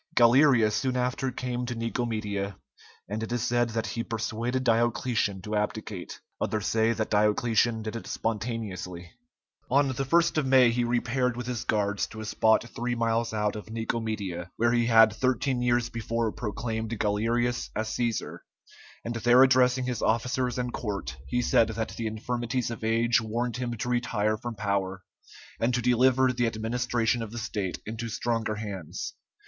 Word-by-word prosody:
Galerius 120 -2 +5
soon 130 +3 0
after 125 +1 -1
came 125 -1 -3
to 120 - -3
Nicomedia, 110 -4 -2 0.5
and 105 +4 -3
it 110 - -4
is 120 -1 -1
said 120 0 +1
that 115 0 -2
he 115 +3 -3
persuaded 115 +3 -2
Diocletian 115 -4 +1
to 105 +2 -3
abdicate. 105 -3 -3 0.2
Others 110 -2 -1
say 110 0 +2
that 110 -2 -2
Diocletian 110 +2 +2
did 110 +1 -5
it 115 - -6
spontaneously. 105 -6 -4 0.6
On 140 +1 +3
the 130 +1 -2
1st 170 +3 +3
of 140 - -1
May 130 -2 +6
he 120 +1 0
repaired 120 +1 0
with 125 - -4
his 125 -1 -3
guards 100 -2 0
to 110 - -10
a 110 - -5
spot 110 +1 +3
three 120 +1 -3
miles 115 0 0
out 105 -1 0
of 105 0 -8
Nicomedia, 110 -6 -3
where 120 +1 +3
he 120 -1 +2
had 110 -2 +6
thirteen 130 +1 0
years 120 -1 +1
before 115 0 -1
proclaimed 110 +1 -3
Galerius 115 +4 0
as 110 - -1
Cæsar, 115 -1 -2 0.7
and 120 - -2
there 120 +3 +6
addressing 130 -1 +4
his 125 -2 -2
officers 125 +2 0
and 125 -1 -2
court, 100 - -4
he 125 - 0
said 115 - +4
that 110 0 -3
the 115 - -4
infirmities 120 +2 -2
of 115 - -7
age 115 +2 +3
warned 115 +2 -2
him 120 -1 -3
to 115 - -3
retire 115 -3 +1
from 115 +2 -6
power, 100 -2 -2 0.6
and 120 +2 +1
to - - +1
deliver 125 +2 +3
the 120 -1 +1
administration 115 +1 0
of 110 -2 -5
the 120 - -7
state 105 -4 -3
into 115 +2 -5
stronger 115 -1 -1
hands. 100 -6 -5
115 Hz, 165 wpm, -27 LUFS, 110-120 Hz, 0.7 s, May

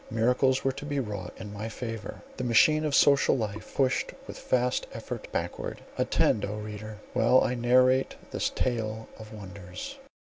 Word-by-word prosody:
Miracles 125 +4 +2
were 135 - +2
to 130 - -8
be 145 -1 -1
wrought 100 -7 -4
in 105 -1 -8
my 105 +2 -4
favour, 115 -2 -6
the 130 - -3
machine 155 +6 +5
of 145 -2 +1
social 140 -1 +5
life 110 -2 -5
pushed 130 -2 +1
with - - -9
vast 125 0 +2
effort - - -6
backward. - - -3 0.2
Attend, 105 - +2
O 105 - -2
reader! 105 0 -7 0.2
while 125 +3 +5
I - - 0
narrate 130 +2 +3 0.2
this - - 0
tale 110 -3 -2
of 110 -1 -10
wonders! 95 -3 -8
115 Hz, 165 wpm, -28 LUFS, 105-130 Hz, 0.2 s, machine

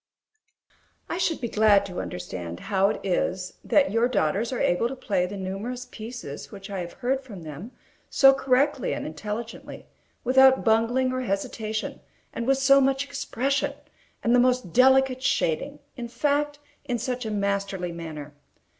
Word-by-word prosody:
I 345 - -3
should 340 -3 0
be 240 - -2
glad 210 -2 +4
to 180 -2 -5
understand 90 -1 -6
how 195 +1 +4
it 215 - -3
is 185 0 -1
that 285 -1 +3
your 230 +3 +3
daughters 205 - 0
are 255 - -2
able 180 +7 +2
to 265 - -5
play 195 -8 0
the 200 +2 -7
numerous 200 +7 -4
pieces 220 - -8
which 200 -1 -9
I 195 - -3
have 175 -1 -6
heard 265 +1 -1
from 205 -9 -10
them 155 - -8 0.4
so 270 -1 +6
correctly 270 0 +1
and - - -5
intelligently, 210 +9 -6 0.4
without 265 +1 +5
bungling 240 +3 +2
or 255 - -1
hesitation, 215 0 -3 0.3
and 235 +1 -4
with 270 0 +4
so 275 +1 +5
much 270 0 +2
expression, 275 -1 -1 0.5
and 235 - +3
the 245 - +6
most 250 -7 +2
delicate 265 0 +5
shading; 260 - 0 0.2
in 240 -3 -5
fact, 290 +3 0 0.3
in 245 -3 -1
such 250 +2 -3
a 220 - -3
masterly 200 -3 -1
manner. 155 -3 -7
230 Hz, 160 wpm, -25 LUFS, 195-260 Hz, 0.5 s, so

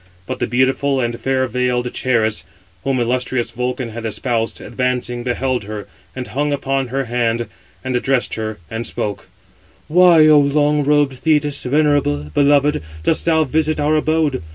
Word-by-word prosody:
But - - -5
the - - 0
beautiful 130 +3 +1
and 120 -1 -2
fair 130 0 0
veiled 125 0 -1
Charis, 110 -4 0 0.4
whom 135 -1 0
illustrious 120 0 -1
Vulcan 125 +1 -3
had 115 +1 -7
espoused, 115 +1 -2
advancing, 125 -1 -2
beheld 125 -2 -1
her; 105 -1 -6 0.3
and 130 -1 -4
hung 145 +4 -2
upon 135 -1 -1
her 135 +3 -2
hand, 120 -1 0 0.4
and 130 -1 -2
addressed 125 0 0
her, 110 -1 -4
and 115 +1 -4
spoke: 105 -1 -4 0.6
"Why, 170 -1 +6
O 155 -1 +7
long 145 +1 +2
robed 145 -2 +2
Thetis, 150 -2 +1
venerable, 135 - +1
beloved, 145 - +3 0.2
dost 160 - +1
thou 160 -1 +3
visit 155 +2 0
our 150 +1 +2
abode? 155 -4 +1
130 Hz, 155 wpm, -18 LUFS, 120-145 Hz, 0.6 s, O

